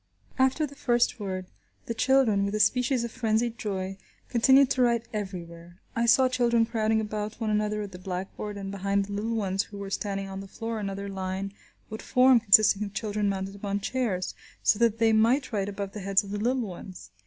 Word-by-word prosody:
After 265 +4 +3
the 285 - -10
first 240 -3 +1
word, 185 -2 -4 0.4
the 230 - -3
children, 240 -5 +3
with 200 +1 -1
a - - -1
species 250 +3 +2
of 235 - -4
frenzied 230 0 0
joy, 195 -2 -4 0.3
continued 265 +3 +5
to 260 - +1
write 235 -1 +2
everywhere. 175 -4 -7 0.2
I 235 0 +1
saw 255 +2 +6
children 240 -2 +2
crowding 220 -1 +1
about 210 0 -4
one 220 -2 -1
another 210 0 0
at 200 - -8
the 180 - -10
blackboard, 190 +3 -5
and 195 -1 -5
behind 200 0 0
the 205 - -7
little 220 +3 -2
ones 195 -3 -1
who 205 - -11
were 200 -1 -6
standing 195 -1 -3
on 195 0 -6
the 195 - -8
floor 225 +3 -5
another 200 -1 -4
line 190 0 -4 0.4
would 220 - -6
form 255 -1 +5
consisting 215 -1 +5
of 200 -1 -7
children 210 -1 -1
mounted 195 0 -3
upon 200 0 -3
chairs, 205 -5 -2 0.3
so 210 - +3
that 230 -2 +3
they 225 -1 +3
might 235 +6 +3
write 200 -1 -1
above 200 -1 -5
the 210 - -7
heads 195 0 +2
of 200 - -9
the 205 - -3
little 245 +3 +1
ones. 185 -2 -9
210 Hz, 205 wpm, -27 LUFS, 195-235 Hz, 0.4 s, saw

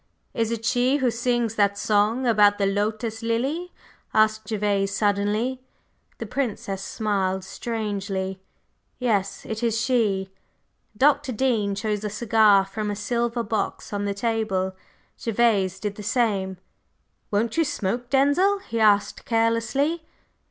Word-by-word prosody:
"Is 225 -1 0
it 225 -1 -3
she 250 +3 +2
who 260 -4 +1
sings 240 -1 0
that 200 -2 +2
song 215 +5 +1
about 205 -3 +5
the 200 - +1
lotus 215 +3 -1
lily?" 270 +10 -1 0.4
asked 215 -1 +3
Gervase, 200 -2 0
suddenly. 210 +5 0 0.6
The - - -5
Princess 205 -7 -3
smiled 190 -2 -1
strangely. 195 -3 -4 0.6
"Yes, 205 -6 -1
it 220 0 -4
is 230 -2 +1
she." 215 -5 +1 0.7
Dr. 290 +1 +3
Dean 220 -5 0
chose 210 0 -2
a 210 - -2
cigar 210 -2 +4
from 210 +2 -4
a 205 - -2
silver 235 +3 -1
box 210 -1 -3
on 205 0 -1
the 200 0 -2
table; 200 -4 -1 0.5
Gervase 205 -5 +2
did 205 0 -3
the 210 - -9
same. 205 -3 0 0.7
"Won't 215 +2 0
you 330 - +3
smoke, 245 -4 -2
Denzil?" 285 +9 +3
he 230 -12 -5
asked 205 -2 +3
carelessly. 230 +8 +1
220 Hz, 130 wpm, -24 LUFS, 200-240 Hz, 0.7 s, about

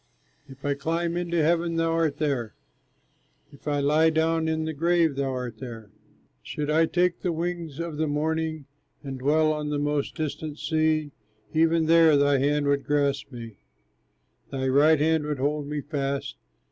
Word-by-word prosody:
If 135 +1 -12
I 145 - +2
climb 165 +4 -2
into 170 -2 0
heaven, 170 +1 +1
thou 165 0 +1
art 165 -3 0
there, 135 -8 -2 1.0
If 140 +1 -15
I 145 -1 +1
lie 155 +3 +4
down 160 0 +1
in 160 0 -1
the 160 - -3
grave, 165 0 +2
thou 135 0 -1
art 125 -4 -5
there. 115 -5 -9 0.5
Should 150 - -4
I 160 +1 +4
take 180 0 +1
the 180 - -1
wings 165 -2 -4
of 165 -3 -4
the 155 0 0
morning, 155 0 -1 0.4
And 135 -2 -6
dwell 155 +3 +2
on 150 -1 -3
the 150 - -1
most 145 0 -1
distant 155 -1 -4
sea, 155 -2 0 0.4
Even 165 0 +3
there 165 -2 +6
thy 140 -1 +3
hand 145 +2 +1
would 140 0 +1
grasp 140 -1 0
me, 115 -4 -9 0.9
Thy 130 -1 -2
right 145 +3 +5
hand 160 +1 +2
would 150 -1 -2
hold 145 +2 -1
me 150 0 -3
fast. 140 - -3
150 Hz, 170 wpm, -26 LUFS, 140-160 Hz, 1.0 s, there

